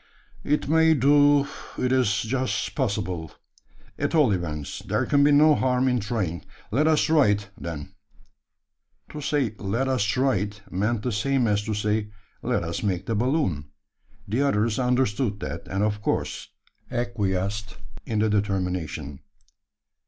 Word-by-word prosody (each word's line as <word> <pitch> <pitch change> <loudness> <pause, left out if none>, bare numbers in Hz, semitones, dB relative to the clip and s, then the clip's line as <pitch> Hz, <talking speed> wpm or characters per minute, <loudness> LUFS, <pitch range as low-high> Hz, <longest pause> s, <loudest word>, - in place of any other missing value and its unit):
"It 150 0 0
may 160 +1 +4
do 145 +1 +5 0.3
it 125 - 0
is 125 -7 +2
just 130 +3 -1
possible. 95 - -2 0.7
At - - 0
all 150 -8 +5
events, 75 -6 -3
there - - -1
can 140 0 +3
be 145 - +5
no 150 +2 +6
harm 130 -2 +1
in 125 -1 +2
trying. 100 -5 -2 0.3
Let 145 +8 +2
us 155 -1 +4
try 155 -5 +4
it, 100 -1 0
then." 75 -4 -7 1.2
To 150 - -7
say, 140 -6 0
"Let 115 +7 -1
us 130 -3 +1
try 130 +4 +2
it," 105 +1 -4
meant 105 +4 -1
the 125 - -1
same 125 +4 +1
as 105 -2 +2
to 110 - -2
say, 105 0 0 0.3
"Let - - 0
us - - -3
make 95 -4 -1
the 115 - -2
balloon." 110 - 0 0.6
The 115 +7 0
others 115 -5 +1
understood 125 -4 +1
that; - - -5
and 95 +2 -1
of 105 -1 -1
course - - -2 0.4
acquiesced 105 -3 -2 0.3
in 110 - -3
the 110 +1 +3
determination. 90 -8 -2
110 Hz, 150 wpm, -25 LUFS, 100-135 Hz, 1.2 s, no